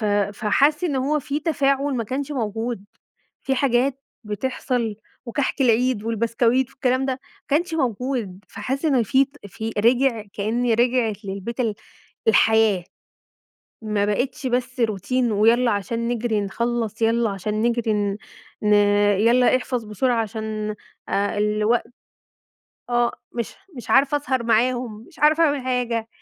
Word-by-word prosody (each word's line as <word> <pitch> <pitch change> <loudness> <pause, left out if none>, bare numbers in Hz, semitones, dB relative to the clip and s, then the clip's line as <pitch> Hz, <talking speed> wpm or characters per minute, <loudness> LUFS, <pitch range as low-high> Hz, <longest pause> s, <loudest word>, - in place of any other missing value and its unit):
ف - - -2
فحس 210 - +2
إن 295 -6 0
هو 280 +4 +1
في 285 +2 -3
تفاعل 280 -3 +1
ما 235 -2 -1
كانش 270 +6 -3
موجود، 225 -3 -3 0.6
في 270 - 0
حاجات 265 +1 +1 0.2
بتحصل، 230 +1 -2 0.3
وكحك 270 +4 -2
العيد 250 -2 +2
والبسكويت 230 +3 +1
والكلام 260 0 0
ده 265 - 0
ما 255 - -5 0.3
كانش 330 +4 +1
موجود، 240 - -2
فحس 270 +4 -4
إن 270 -6 +3
في 265 +5 +3
ت 275 -5 -15
في 220 +3 -5
رجع 240 +1 +3
كأن 230 +4 0
رجعِت 235 -2 +1
للبيت 200 +5 -5
ال 225 -4 0 0.5
الحياة، 220 -3 +4 1.0
ما 210 -2 0
بقتش 250 +6 -1
بس 250 +1 -2
روتين 230 +3 0
ويالّا 230 +4 +4
عشان 230 +4 -2
نجري 235 -3 0
نخلص، 230 +2 -2
يالّا 230 0 +2
عشان 210 +2 -3
نجري 235 -1 +1
ن 205 -1 -1 0.5
ن 210 0 +4 0.5
يالّا 240 +3 +4
احفظ 250 -2 -3
بسرعة 230 +3 0
عشان 215 -1 -4 0.3
آآ 200 +1 0
الوقت، 210 +3 +1 1.0
آه 240 0 +2 0.2
مش 235 -2 -4 0.2
مش 235 -3 -8
عارفة 275 +2 +4
أسهر 260 -3 -1
معاهم، 235 -1 0
مش 335 - -20
عارفة 310 +2 +4
أعمل 290 -3 +1
حاجة. 240 -3 -1
235 Hz, 135 wpm, -22 LUFS, 215-260 Hz, 1.0 s, الحياة